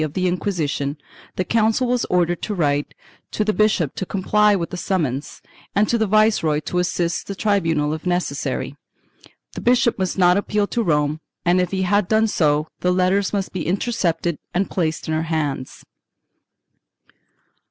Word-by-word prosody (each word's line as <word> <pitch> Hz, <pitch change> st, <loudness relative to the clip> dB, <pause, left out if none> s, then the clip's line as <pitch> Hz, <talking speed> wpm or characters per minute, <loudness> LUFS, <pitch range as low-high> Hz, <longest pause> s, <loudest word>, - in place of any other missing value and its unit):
of 150 Hz, -2 st, -4 dB
the 185 Hz, 0 st, 0 dB
Inquisition, 160 Hz, -6 st, -1 dB, 0.4 s
the 185 Hz, -, 0 dB
Council 225 Hz, +2 st, +2 dB
was 245 Hz, 0 st, 0 dB
ordered 175 Hz, -1 st, +1 dB
to 210 Hz, -, -3 dB
write 145 Hz, -4 st, 0 dB, 0.3 s
to 215 Hz, -, -1 dB
the 215 Hz, -, +1 dB
bishop 210 Hz, -9 st, +2 dB
to -, -, -4 dB
comply 205 Hz, +2 st, +2 dB
with 170 Hz, -3 st, -3 dB
the -, -, -4 dB
summons, 155 Hz, -7 st, -2 dB, 0.3 s
and 210 Hz, +1 st, +3 dB
to 235 Hz, -, +1 dB
the 220 Hz, -, +1 dB
viceroy 215 Hz, -7 st, +3 dB
to 180 Hz, -, -2 dB
assist 175 Hz, -1 st, -1 dB
the 200 Hz, -, -4 dB
tribunal 165 Hz, -8 st, +1 dB
if 155 Hz, -, -6 dB
necessary; 180 Hz, 0 st, -2 dB, 0.8 s
the -, -, -6 dB
bishop 240 Hz, -2 st, +2 dB
must 185 Hz, 0 st, -1 dB
not 180 Hz, 0 st, +5 dB
appeal 205 Hz, 0 st, 0 dB
to 235 Hz, -, -2 dB
Rome 150 Hz, -5 st, +1 dB, 0.3 s
and 180 Hz, +1 st, +4 dB
if 180 Hz, -, -1 dB
he 190 Hz, -1 st, -1 dB
had 205 Hz, +1 st, +2 dB
done 220 Hz, +2 st, +3 dB
so 155 Hz, -7 st, +1 dB
the 180 Hz, -, +1 dB
letters 185 Hz, +2 st, +2 dB
must 200 Hz, -2 st, -2 dB
be 180 Hz, -5 st, -3 dB
intercepted 175 Hz, -4 st, -1 dB, 0.2 s
and 190 Hz, +2 st, 0 dB
placed 165 Hz, -3 st, -1 dB
in 160 Hz, -, -1 dB
her 155 Hz, -, +1 dB
hands. 145 Hz, -5 st, -3 dB
180 Hz, 170 wpm, -21 LUFS, 160-205 Hz, 0.8 s, not